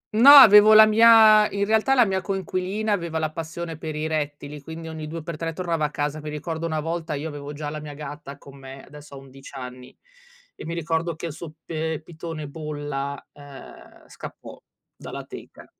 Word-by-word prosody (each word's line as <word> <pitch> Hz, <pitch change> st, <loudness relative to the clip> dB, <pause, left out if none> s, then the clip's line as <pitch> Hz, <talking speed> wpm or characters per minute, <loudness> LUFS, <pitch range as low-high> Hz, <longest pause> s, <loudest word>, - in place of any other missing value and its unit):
No, 240 Hz, +6 st, +7 dB
avevo 215 Hz, -6 st, +9 dB
la 215 Hz, 0 st, +9 dB
mia 215 Hz, -1 st, +6 dB
in 200 Hz, 0 st, -2 dB
realtà 220 Hz, +5 st, +2 dB
la 245 Hz, -3 st, +5 dB
mia 190 Hz, -2 st, -2 dB
coinquilina 195 Hz, +2 st, -3 dB
aveva 170 Hz, -5 st, -2 dB
la 155 Hz, -1 st, -2 dB
passione 165 Hz, 0 st, -7 dB
per 160 Hz, -2 st, -6 dB
i 155 Hz, +1 st, -3 dB
rettili, 145 Hz, -2 st, -4 dB
quindi 160 Hz, +3 st, -9 dB
ogni 160 Hz, -1 st, -7 dB
due 165 Hz, +1 st, -7 dB
per 165 Hz, -1 st, -7 dB
tre 165 Hz, +1 st, -4 dB
tornava 165 Hz, -3 st, -2 dB
a 150 Hz, -, -2 dB
casa. 150 Hz, +1 st, -4 dB
Mi 150 Hz, -, -7 dB
ricordo 160 Hz, +2 st, -5 dB
una 155 Hz, -1 st, -3 dB
volta, 165 Hz, 0 st, -4 dB
io 145 Hz, +3 st, -5 dB
avevo 145 Hz, -1 st, -8 dB
già 150 Hz, 0 st, -6 dB
la 155 Hz, -, -6 dB
mia 150 Hz, -1 st, -9 dB
gatta 145 Hz, -1 st, -9 dB
con 140 Hz, -1 st, -15 dB
me, 135 Hz, 0 st, -11 dB
adesso 145 Hz, 0 st, -14 dB
ha -, -, -9 dB
11 135 Hz, 0 st, -14 dB
anni, 125 Hz, -1 st, -10 dB, 0.6 s
e -, -, -10 dB
mi 165 Hz, -, -4 dB
ricordo 165 Hz, 0 st, -2 dB
che 165 Hz, -, -8 dB
il 165 Hz, -, -5 dB
suo 165 Hz, +1 st, -9 dB, 0.2 s
p -, -, -66 dB
ehm, 160 Hz, -1 st, -3 dB
pitone 160 Hz, -2 st, -8 dB
bolla, 145 Hz, -2 st, -6 dB
uhm, 145 Hz, -2 st, -15 dB
scappò -, -, -11 dB, 0.3 s
dalla -, -, -9 dB
teca. -, -, -12 dB
160 Hz, 200 wpm, -23 LUFS, 145-175 Hz, 0.6 s, avevo